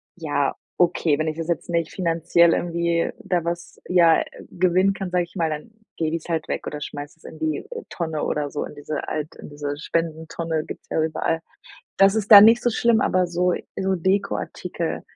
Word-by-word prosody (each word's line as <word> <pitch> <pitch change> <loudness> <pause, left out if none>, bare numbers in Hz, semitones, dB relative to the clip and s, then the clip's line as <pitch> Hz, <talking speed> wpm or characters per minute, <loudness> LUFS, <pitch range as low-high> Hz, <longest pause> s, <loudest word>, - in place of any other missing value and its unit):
Ja, 145 -5 -1 0.2
okay, 170 -4 +2
wenn 155 - 0
ich 155 - -2
das 165 -1 -4
jetzt 170 -1 -2
nicht 170 -1 0
finanziell 170 -1 +3
irgendwie 170 -1 0
da 180 -4 0
was, 170 0 -5
ja 170 -3 +5 0.3
gewinnen 185 +2 +2
kann, 195 -2 -5
sage 180 -1 +2
ich 170 - -24
mal, 165 -4 0
dann 155 +9 -6 0.3
lege 160 0 0
ich's 160 - -12
halt 165 -2 -2
weg - - -3
oder 150 0 -5
schmeiß 145 +2 -7
es - - -27
in - - -10
die 155 -2 -2 0.2
Tonne 160 -3 -3
oder 145 -1 -1
so, 145 - -3
in - - -10
diese 145 +1 -5
Alt 155 0 -4
in - - -11
diese 145 0 -5
Spendentonne 160 0 -2
gibt's - - -9
ja 160 - 0
überall. 160 +1 0 0.6
Das 195 +1 +6
ist 220 -1 +1
da 205 - +13
nicht 230 +3 +7
so 240 - +2
schlimm, 230 0 +3
aber 185 -1 +2
so 175 +1 +1 0.2
so 190 0 0
Dekoartikel. 185 -2 -2
170 Hz, 195 wpm, -23 LUFS, 155-180 Hz, 0.6 s, da